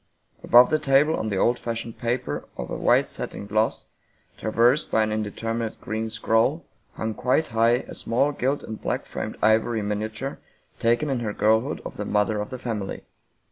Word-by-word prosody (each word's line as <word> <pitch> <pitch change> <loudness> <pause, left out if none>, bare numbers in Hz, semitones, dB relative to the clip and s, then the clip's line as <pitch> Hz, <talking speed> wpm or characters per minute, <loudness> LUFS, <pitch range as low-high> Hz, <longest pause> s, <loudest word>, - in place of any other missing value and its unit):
Above 120 +1 +7
the 155 - +3
table 150 +2 +3
on 110 - -2
the 100 - -1
old 120 +5 +2
fashioned 115 -1 -4
paper, 120 - -2
of - - -5
a - - -2
white - - +3
satin - - -5
gloss, 110 +2 0 0.5
traversed 120 +6 +2
by 110 - +3
an 110 - -1
indeterminate 110 +1 -3
green 110 +1 -3
scroll, 115 +8 +1 0.3
hung 110 0 -3
quite 125 +7 +1
high 115 +2 +2
a - - -8
small 130 +6 +1
gilt 140 0 -1
and 110 -1 -7
black - - -2
framed - - -5
ivory 110 0 +3
miniature 110 +5 -3 0.4
taken 120 +6 +2
in 135 -3 0
her 110 -3 -3
girlhood 110 +8 +1
of - - -7
the 105 - -3
mother 105 +1 +1
of 105 - -4
the 130 - -5
family. 110 -6 -4
115 Hz, 180 wpm, -25 LUFS, 110-125 Hz, 0.5 s, Above